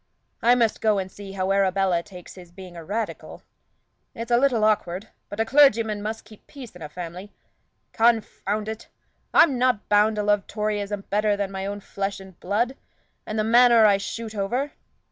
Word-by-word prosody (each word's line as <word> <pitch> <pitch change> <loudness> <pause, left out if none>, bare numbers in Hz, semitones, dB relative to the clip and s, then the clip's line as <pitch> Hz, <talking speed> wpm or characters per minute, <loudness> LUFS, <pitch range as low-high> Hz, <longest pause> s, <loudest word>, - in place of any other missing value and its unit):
I 240 +1 +5
must 230 -3 +1
go 215 -2 +2
and 190 -1 -4
see 195 0 -10
how 190 0 -1
Arabella 195 -2 +2
takes 180 0 -12
his 180 -2 -14
being 180 -1 -12
a 170 - -8
Radical. 215 +6 -5 0.7
It's 230 +1 -6
a 235 - +5
little 245 -4 +2
awkward; 210 -2 0 0.2
but 205 - -8
a 225 - +2
clergyman 225 -6 +4
must 220 +2 -5
keep 215 -1 -17
peace 255 -9 -11
in 180 - -13
a 150 - -7
family. 180 +4 -8 0.6
Confound 215 -2 0
it! 220 0 -6 0.4
I'm 275 -7 +5
not 250 -4 +1
bound 210 +1 +4
to 210 - -1
love 205 -1 +1
Toryism 210 -1 -3
better 210 0 +1
than 200 -1 -3
my 190 0 -4
own 205 0 -5
flesh 200 0 -4
and 190 -2 -14
blood, 230 +7 -1 0.5
and 215 - -4
the 215 - +1
manor 235 0 +6
I 200 -2 +5
shoot 220 +3 -6
over. 240 +8 -2
210 Hz, 185 wpm, -24 LUFS, 195-225 Hz, 0.7 s, manor